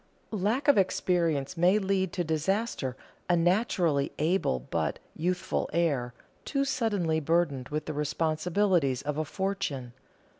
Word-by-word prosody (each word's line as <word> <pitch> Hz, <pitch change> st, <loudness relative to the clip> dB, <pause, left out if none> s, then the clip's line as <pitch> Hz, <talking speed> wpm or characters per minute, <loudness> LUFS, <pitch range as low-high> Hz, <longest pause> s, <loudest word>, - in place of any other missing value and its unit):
Lack 220 Hz, +8 st, 0 dB
of 285 Hz, -7 st, +6 dB
experience 170 Hz, -6 st, +1 dB
may 180 Hz, +4 st, +4 dB
lead 190 Hz, -2 st, 0 dB
to 180 Hz, -, 0 dB
disaster 160 Hz, -, -1 dB, 0.3 s
a 175 Hz, -, +5 dB
naturally 175 Hz, -5 st, +2 dB
able 160 Hz, -, +1 dB
but 65 Hz, -, -2 dB, 0.2 s
youthful 180 Hz, +2 st, -1 dB
heir, 140 Hz, -8 st, 0 dB, 0.3 s
too 275 Hz, -1 st, 0 dB
suddenly 200 Hz, -12 st, 0 dB
burdened 155 Hz, -4 st, 0 dB
with 150 Hz, +1 st, -3 dB
the 155 Hz, -, -4 dB
responsibilities 155 Hz, 0 st, +1 dB
of 150 Hz, +1 st, -2 dB
a 155 Hz, -, 0 dB
fortune. 170 Hz, -10 st, -3 dB
170 Hz, 125 wpm, -29 LUFS, 150-195 Hz, 0.3 s, of